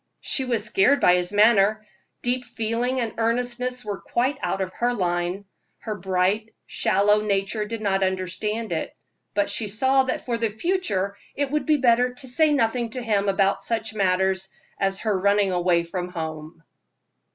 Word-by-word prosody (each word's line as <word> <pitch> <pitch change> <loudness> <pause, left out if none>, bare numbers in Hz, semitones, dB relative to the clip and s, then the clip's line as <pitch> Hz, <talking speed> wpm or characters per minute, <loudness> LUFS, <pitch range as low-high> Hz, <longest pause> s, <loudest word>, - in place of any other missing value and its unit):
She 265 -3 +1
was 235 -4 0
scared 225 +5 +3
by 180 - +5
his 180 +1 0
manner. 215 0 +4 0.4
Deep 250 +1 0
feeling 240 +3 -2
and 230 -3 -2
earnestness 245 +1 -1
were 205 -2 -4
quite 255 +4 -1
out 180 +2 -1
of 185 -1 -3
her 245 +1 +1
line; 175 0 -1 0.3
her 220 - -5
bright, 190 +3 0 0.2
shallow 205 +2 +2
nature 205 +1 -1
did 225 +1 -5
not 195 -2 +1
understand 190 +4 -2
it, - - -3 0.4
but 305 0 +2
she 220 - -2
saw 260 +6 +3
that 260 - -3
for 235 -2 -2
the 230 -1 +1
future 210 - -1 0.2
it 285 -1 -1
would 300 +2 -1
be 305 -1 +4
better 250 -1 +3
to 260 - -10
say 305 +5 +3
nothing 240 -3 +1
to 250 +3 -5
him 205 -3 +1
about 195 0 +1
such 225 -1 -2
matters 190 -1 +1 0.3
as 195 0 0
her 215 -3 0
running 200 0 +2
away 175 -1 +2
from 175 +1 -5
home. 160 -1 -7
215 Hz, 170 wpm, -24 LUFS, 190-245 Hz, 0.4 s, by